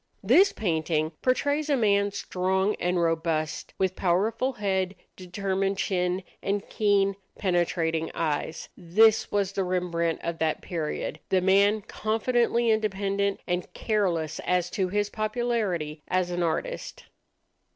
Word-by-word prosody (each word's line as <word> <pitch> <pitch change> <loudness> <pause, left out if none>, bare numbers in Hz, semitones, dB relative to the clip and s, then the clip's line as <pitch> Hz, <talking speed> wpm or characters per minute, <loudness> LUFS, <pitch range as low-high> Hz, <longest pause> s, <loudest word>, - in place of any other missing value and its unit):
This 340 - +6
painting 160 -4 -1
portrays 285 +4 +1
a 285 - +3
man 200 -3 +3
strong 190 0 0
and 180 0 0
robust, 165 -2 -1
with 190 -1 0
powerful 215 +8 +1
head, 195 -3 -1 0.2
determined 195 +1 -2
chin, 180 -1 0 0.2
and 200 0 -2
keen, 200 -2 +2 0.2
penetrating 170 -3 0
eyes. 160 0 -2
This 215 +6 +3
was 200 -2 +1
the 195 -1 -1
Rembrandt 175 -2 -1
of 170 -1 -3
that 160 -1 0
period, 160 -4 -4
the 190 - +3
man 200 +3 +4
confidently 235 +2 +1
independent 200 -2 0
and 180 0 -2
careless 180 -8 0
as 180 -1 0
to 190 -2 0
his 205 +1 -1
popularity 215 -9 -1
as 185 -1 0
an 175 0 -1
artist. 175 - -3
190 Hz, 125 wpm, -27 LUFS, 175-210 Hz, 0.2 s, This